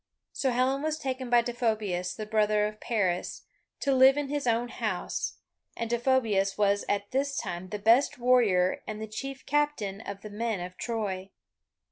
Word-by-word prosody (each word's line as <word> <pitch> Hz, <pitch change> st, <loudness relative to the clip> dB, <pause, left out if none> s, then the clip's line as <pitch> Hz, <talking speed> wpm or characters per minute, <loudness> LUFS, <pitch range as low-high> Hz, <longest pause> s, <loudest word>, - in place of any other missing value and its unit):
So 270 Hz, -, 0 dB
Helen 255 Hz, +2 st, +1 dB
was 310 Hz, 0 st, -1 dB
taken 260 Hz, -3 st, -4 dB
by 240 Hz, -1 st, +5 dB
Deiphobus, 215 Hz, -7 st, -1 dB
the 215 Hz, -, -5 dB
brother 210 Hz, -1 st, +2 dB
of 215 Hz, 0 st, -5 dB
Paris, 190 Hz, -7 st, -1 dB, 0.4 s
to 275 Hz, -, +2 dB
live 265 Hz, +1 st, +6 dB
in 290 Hz, -2 st, -2 dB
his 290 Hz, -2 st, -2 dB
own 235 Hz, +1 st, +1 dB
house, 215 Hz, -7 st, -3 dB, 0.4 s
and 230 Hz, 0 st, -3 dB
Deiphobus 230 Hz, -6 st, +2 dB
was 205 Hz, -1 st, +2 dB
at 200 Hz, 0 st, -1 dB
this 275 Hz, +1 st, 0 dB
time 175 Hz, +2 st, -4 dB
the 210 Hz, -, -3 dB
best 230 Hz, +8 st, +4 dB
warrior 230 Hz, -8 st, +3 dB
and 215 Hz, 0 st, -5 dB
the 220 Hz, -, -4 dB
chief 270 Hz, +5 st, -7 dB
captain 290 Hz, -9 st, 0 dB
of 200 Hz, -2 st, -7 dB
the 215 Hz, -, -8 dB
men 220 Hz, -1 st, -2 dB
of 180 Hz, +1 st, -6 dB
Troy. 200 Hz, -5 st, -3 dB
225 Hz, 170 wpm, -28 LUFS, 200-260 Hz, 0.4 s, live